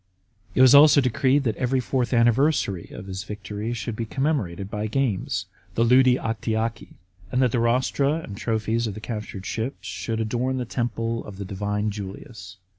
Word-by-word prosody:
It - - +4
was 130 0 +8
also 145 +1 +8
decreed 130 +2 +2
that 110 -5 0
every 130 +1 +1
fourth 125 0 -1
anniversary 120 - +2
of - - -8
his 95 -1 -5
victory 105 +2 -5
should 115 -1 -4
be 115 0 -4
commemorated 115 - -1
by 105 +1 -3
games 120 -4 -1 0.3
(ludi 125 +2 +5
Actiaci); 110 0 -3 0.4
and 125 - +1
that 125 -3 +3
the 120 - +1
rostra 130 +4 +2
and 160 -11 -6
trophies 110 +2 -1
of 105 - -5
the - - -6
captured 105 -3 -6
ships 115 +7 -4
should 115 -1 -3
adorn 125 +4 -1
the 125 - -2
temple 115 -1 -2
of 100 -2 -9
the 100 - -5
divine 105 +2 -2
Julius. 100 -1 -8
115 Hz, 170 wpm, -24 LUFS, 105-130 Hz, 0.4 s, was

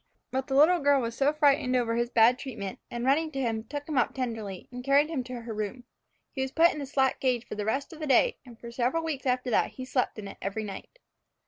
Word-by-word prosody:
But 265 0 -2
the 270 - -1
little 325 +6 +6
girl 285 -1 +4
was 230 -2 -4 0.2
frightened 280 -4 +3
over 235 -2 +1
his 235 0 0
bad 240 +2 +5
treatment, 215 -8 -6
and 240 0 -4
running 310 +4 +2
to 270 - -3
him, 225 -3 -1
took 290 +4 -6
him 300 -5 +1
up 240 - 0
tenderly, 225 -7 -4
and 250 0 -7
carried 280 +3 +4
him 275 -6 -2
to 250 -1 -6
her 230 -1 -6
room. 215 +4 -4 0.5
He 265 - -4
was 265 - -1
put 330 +3 +5
into 300 - -6
the 280 - -4
slat 265 -1 +1
cage 250 -2 0
for - - -6
the 210 -1 -3
rest 270 +8 -2
of 320 - -11
the 310 - -4
day, 380 - +3
and 240 -3 -14
for 235 - -9
several 255 +7 0
weeks 290 -4 -3
after 250 0 0
that - - +2
slept 255 -2 -1
in 210 -2 -6
it - - -10
every 200 +3 -3
night. 205 - -8
255 Hz, 250 wpm, -28 LUFS, 230-280 Hz, 0.5 s, little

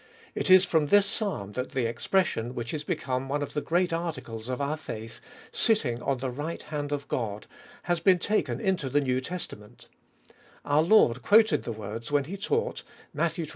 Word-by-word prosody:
It - - -2
is 185 0 +8
from 160 -5 +2
this 205 +5 +5
Psalm 195 - -3
that 125 +4 -4
the 130 -3 0
expression, 120 0 0
which 120 -1 -4
is 150 -1 -3
become 130 -2 -2
one 145 +1 0
of - - -7
the 150 - -1
great 175 +2 +1
articles 145 -9 -4
of 125 - -2
our 140 +2 0
faith, 115 -7 -8 0.3
Sitting 125 - +1
on 135 - 0
the 130 0 -3
right 150 +6 -5
hand 145 -1 -4
of 140 -1 -3
God, 105 -4 -3 0.4
has 175 -1 0
been 185 +2 +5
taken 210 +5 0
into 190 - 0
the 145 +3 +3
New 130 -2 0
Testa 180 +7 -5
ment 105 0 -16 0.8
Our 145 +1 +3
Lord 160 - +4
quoted 220 +1 +4
the - - -3
words 110 +3 -6
when 145 -1 +3
he 170 +8 -6
taught 450 - -1 0.3
(Matt 170 -1 0
xxii. 165 -2 -5
145 Hz, 195 wpm, -28 LUFS, 125-175 Hz, 0.8 s, is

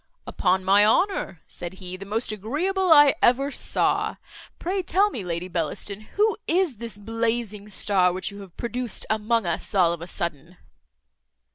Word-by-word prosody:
"Upon 185 0 0
my 200 +2 +6
honour," 220 - +1
said 175 +1 -7
he, 185 -1 -7
"the 195 +1 -9
most 220 +2 -1
agreeable 330 - -1
I 290 -3 +8
ever 270 +4 +3
saw. - - 0 0.4
Pray 375 +3 -2
tell 390 +4 +2
me, 215 - -5
Lady 175 0 -3
Bellaston, 180 +4 -3 0.2
who 425 +1 +2
is 345 - +1
this 230 -1 -5
blazing 225 -1 -2
star 190 -2 +2
which 185 +2 -4
you 200 0 -10
have 190 -3 -14
produced 240 0 -3
among 220 0 +1
us 170 +5 -2
all 175 -3 +4
of 170 - -7
a 170 - -7
sudden?" 170 0 -5
210 Hz, 160 wpm, -24 LUFS, 185-255 Hz, 0.4 s, I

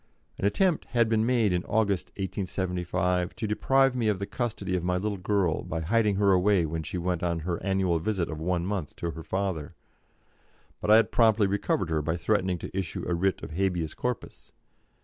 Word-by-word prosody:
An - - -1
attempt 175 - +2
had 120 -2 +2
been 110 0 +2
made 115 -6 +2
in 90 0 0
August, 100 -4 +1
1875, 90 -2 -2
to 110 - -3
deprive 135 +5 +2
me 120 -3 0
of 105 -2 +2
the 100 - -3
custody 110 -5 -3
of 90 - -1
my 90 0 +1
little 100 +1 -2
girl 95 -3 +1
by 80 0 -4
hiding 105 +4 +2
her 100 0 +3
away 95 -1 +3
when 80 +1 -3
she 85 - -5
went 90 -1 -1
on 85 -2 -1
her 85 +1 -3
annual 95 -4 +1
visit 95 0 -1
of 80 - -6
one 85 +1 -1
month 95 -6 -3
to 85 - -3
her 80 - -8
father, 95 -6 -3 1.1
but - - -2
I 110 - +9
had 115 - +4
promptly 110 -2 +4
recovered 95 -3 0
her 80 -1 +1
by 80 +3 -1
threatening 95 -1 +1
to 85 - -8
issue 95 -5 -3
a 90 - 0
writ 90 +1 0
of - - -6
_habeas 90 -3 -1
corpus. 125 -1 -5
95 Hz, 200 wpm, -27 LUFS, 85-105 Hz, 1.1 s, I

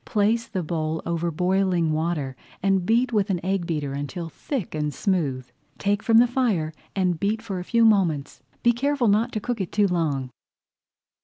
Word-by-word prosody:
Place 225 +2 +1
the 185 -4 -3
bowl 160 -1 -2
over 170 0 -1
boiling 180 0 +1
water 155 -4 -1 0.3
and 195 -2 +2
beat 240 +2 +2
with 205 -1 +2
an 185 -3 0
egg 190 -2 0
beater 150 -4 -2
until 155 +5 -4
thick 240 - -4
and 150 -1 -1
smooth. 145 - -1 0.3
Take 200 0 0
from 225 0 +4
the 240 - +8
fire 225 -11 0 0.2
and 180 -4 +1
beat 210 +2 0
for 195 -5 -4
a - - -4
few 230 +4 +3
moments. 180 -10 +2 0.2
Be 240 - +6
careful 265 0 +1
not 220 +4 +2
to 215 - -1
cook 230 0 -3
it 185 - -4
too 205 -1 +3
long. 150 -8 -1
185 Hz, 180 wpm, -24 LUFS, 160-220 Hz, 0.3 s, the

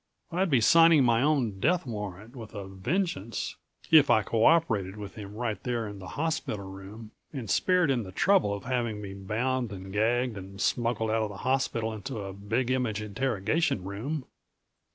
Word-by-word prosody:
I'd 180 +2 +1
be 135 -5 +4
signing 165 +3 +7
my 120 -1 +3
own 130 -9 +1
death 170 - +2
warrant 105 0 -6
with 115 -3 -9
a 100 -1 -5
vengeance 115 - -2 0.4
if 155 -3 +7
I 110 - +5
co 115 +1 +1
operated 115 - +3
with 105 -1 -7
him 105 -1 -9
right 110 -2 -3
there 120 -4 -2
in 100 -1 -8
the 95 - -9
hospital 150 -10 -2
room 95 +3 -10 0.2
and 130 -7 -5
spared 180 - +3
him 125 -3 +1
the 95 -4 -8
trouble 190 - +3
of 100 0 -4
having 120 -4 -1
me 100 -2 -7
bound 115 +5 -2
and 95 -1 -8
gagged 115 +1 +1
and 95 +1 -10
smuggled 115 -1 0
out 110 0 +2
of 110 - -1
the 100 - -8
hospital 125 -4 0
into 115 +4 -6
a 95 -1 -6
Big 115 +6 -1
Image 125 -5 0
interrogation 115 - 0
room. 125 +9 -4
115 Hz, 180 wpm, -28 LUFS, 100-130 Hz, 0.4 s, signing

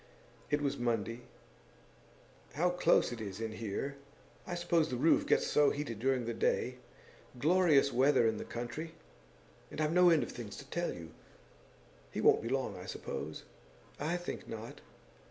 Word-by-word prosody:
It 150 0 +1
was 140 - -1
Monday. 115 -1 -1 1.3
'How 175 +4 +2
close 180 - +3
it 120 -2 -6
is 100 -2 -6
in 115 -1 -3
here! 115 +6 -4 0.5
I 175 - -3
suppose 170 -2 +1
the 125 - -2
roof 160 +7 +3
gets - - +3
so 145 -1 +4
heated 140 -7 -4
during 130 0 +1
the 115 - -2
day. - - 0 0.6
Glorious 155 -1 +4
weather 130 0 +4
in 110 -1 0
the - - -4
country! 120 +8 -6 0.7
And 150 - -8
I've 155 +1 +1
no 180 0 +7
end 165 -3 +4
of - - -6
things 115 -4 -7
to 140 - -9
tell 175 0 -1
you. 80 -1 -9 1.0
He - - -4
won't - - +5
be - - -4
long, - - -1
I - - -9
suppose?' - - -5 0.6
'I 160 +5 0
think 175 - -6
not. 115 0 -7
140 Hz, 165 wpm, -33 LUFS, 115-160 Hz, 1.3 s, no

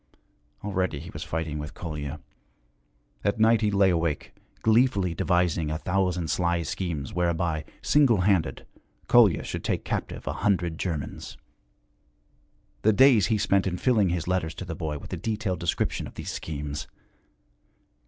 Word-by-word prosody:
Already 95 -7 -1
he 85 +4 -9
was 75 - -6
fighting 80 -2 -3
with 75 0 -7
Kolya. 75 -3 -5 1.0
At 100 +3 0
night 115 +1 +5
he 105 - +2
lay 100 -2 +4
awake, 85 -3 -1 0.3
gleefully 110 -6 +3
devising 85 -2 +1
a 80 - -1
thousand 90 -1 0
sly 85 -1 +1
schemes 80 -6 -4
whereby, 85 -2 0 0.2
single 130 -9 +4
handed, 90 -8 +1 0.4
Kolya 110 -9 +5
should - - -5
take - - -1
captive - - -3
a - - -2
hundred 85 -5 +1
Germans; 80 -6 -4 1.4
the 110 - +4
days 125 -1 +6
he 110 - +2
spent 100 -1 +2
in 90 -1 -2
filling 110 -4 +3
his 85 -2 -2
letters 90 -4 -1
to 95 - -6
the 85 - -5
boy 80 -2 -3
with - - -9
a - - -2
detailed 105 -5 -2
description 85 - -1
of - - -13
these - - -5
schemes. 75 -2 -5
90 Hz, 150 wpm, -26 LUFS, 80-100 Hz, 1.4 s, days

